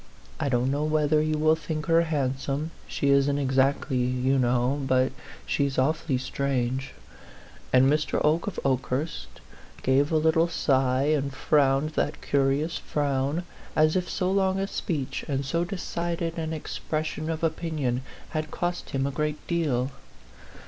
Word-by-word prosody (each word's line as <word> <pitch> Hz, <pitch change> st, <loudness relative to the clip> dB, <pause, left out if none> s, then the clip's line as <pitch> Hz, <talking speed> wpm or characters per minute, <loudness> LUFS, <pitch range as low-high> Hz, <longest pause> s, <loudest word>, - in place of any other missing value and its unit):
I 140 Hz, -, 0 dB
don't 125 Hz, +1 st, +1 dB
know 145 Hz, +2 st, 0 dB
whether 155 Hz, 0 st, +2 dB
you 155 Hz, 0 st, 0 dB
will 155 Hz, +1 st, +4 dB
think 155 Hz, -1 st, -4 dB
her 165 Hz, +1 st, +4 dB
handsome 140 Hz, -1 st, -1 dB, 0.2 s
she 140 Hz, -, -1 dB
isn't 140 Hz, +1 st, +3 dB
ex 135 Hz, -1 st, +1 dB
actly, 135 Hz, 0 st, +2 dB
you 125 Hz, +2 st, +1 dB
kno\v. 125 Hz, +3 st, +1 dB
But 130 Hz, 0 st, +3 dB, 0.3 s
she's 140 Hz, -2 st, 0 dB
awfully 140 Hz, 0 st, +1 dB
strange," 130 Hz, 0 st, -2 dB, 0.8 s
and 130 Hz, 0 st, +6 dB
Mr. 150 Hz, +2 st, +1 dB
Oke 160 Hz, +5 st, +2 dB
of 205 Hz, -, -3 dB
Okehurst 130 Hz, -, -1 dB, 0.6 s
gave 135 Hz, +3 st, +3 dB
a 160 Hz, -, +3 dB
little 160 Hz, +2 st, +3 dB
sigh 130 Hz, -5 st, +2 dB
and 140 Hz, -2 st, 0 dB
frowned 140 Hz, +2 st, +2 dB
that -, -, -1 dB
curious 140 Hz, +4 st, +1 dB
frown, 145 Hz, +2 st, -1 dB, 0.3 s
as 155 Hz, +1 st, +4 dB
if 180 Hz, -1 st, 0 dB
so 185 Hz, -1 st, 0 dB
long 190 Hz, -1 st, +2 dB
a 195 Hz, -, 0 dB
speech 145 Hz, -8 st, -3 dB
and 140 Hz, -1 st, -1 dB
so 170 Hz, +5 st, 0 dB
decided 170 Hz, -2 st, -3 dB
an 160 Hz, 0 st, -3 dB
expression 155 Hz, 0 st, -3 dB
of 160 Hz, 0 st, -3 dB
opinion 155 Hz, -6 st, -1 dB, 0.3 s
had 155 Hz, -1 st, -3 dB
cost 175 Hz, +2 st, -3 dB
him 135 Hz, 0 st, -1 dB
a 140 Hz, -, -1 dB
great 150 Hz, +1 st, -2 dB
deal. 140 Hz, -7 st, 0 dB
145 Hz, 150 wpm, -26 LUFS, 135-160 Hz, 0.8 s, and